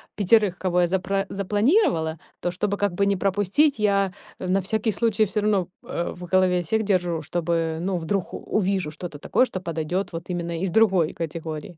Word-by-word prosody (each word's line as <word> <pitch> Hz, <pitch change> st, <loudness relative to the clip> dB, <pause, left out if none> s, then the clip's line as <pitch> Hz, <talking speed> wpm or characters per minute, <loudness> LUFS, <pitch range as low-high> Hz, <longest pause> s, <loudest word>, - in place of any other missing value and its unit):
5, 205 Hz, -2 st, +3 dB
кого 180 Hz, -1 st, +1 dB
я 175 Hz, -, +3 dB
запра 195 Hz, +2 st, 0 dB
запланировала, 200 Hz, -, +1 dB, 0.2 s
то, 175 Hz, -, -1 dB
чтобы 200 Hz, +3 st, -1 dB
как 205 Hz, -2 st, 0 dB
бы 200 Hz, +3 st, +1 dB
не 200 Hz, 0 st, +2 dB
пропустить, 205 Hz, -, +2 dB
я, 200 Hz, -2 st, +2 dB, 0.3 s
э, 185 Hz, -, -4 dB
на 190 Hz, +2 st, +2 dB
всякий 220 Hz, +3 st, 0 dB
случай 220 Hz, -1 st, +1 dB
всё 210 Hz, +1 st, -2 dB
равно, 205 Hz, -4 st, +1 dB, 0.2 s
э, 170 Hz, -, -3 dB
в 180 Hz, -, -10 dB
голове 180 Hz, 0 st, +3 dB
всех 220 Hz, +6 st, 0 dB
держу, 180 Hz, -5 st, 0 dB
чтобы, 165 Hz, 0 st, -1 dB
ну, 185 Hz, 0 st, -1 dB
вдруг 175 Hz, +3 st, -2 dB
увижу 195 Hz, -6 st, -1 dB
что-то 155 Hz, -1 st, -8 dB
такое, 255 Hz, -, +2 dB
что 190 Hz, -7 st, -6 dB
подойдёт 170 Hz, +3 st, -2 dB
вот 165 Hz, +2 st, -7 dB
именно 170 Hz, -1 st, -3 dB
из 190 Hz, -, 0 dB
другой 190 Hz, -5 st, +3 dB
категории. 160 Hz, 0 st, -6 dB
185 Hz, 185 wpm, -24 LUFS, 170-205 Hz, 0.3 s, 5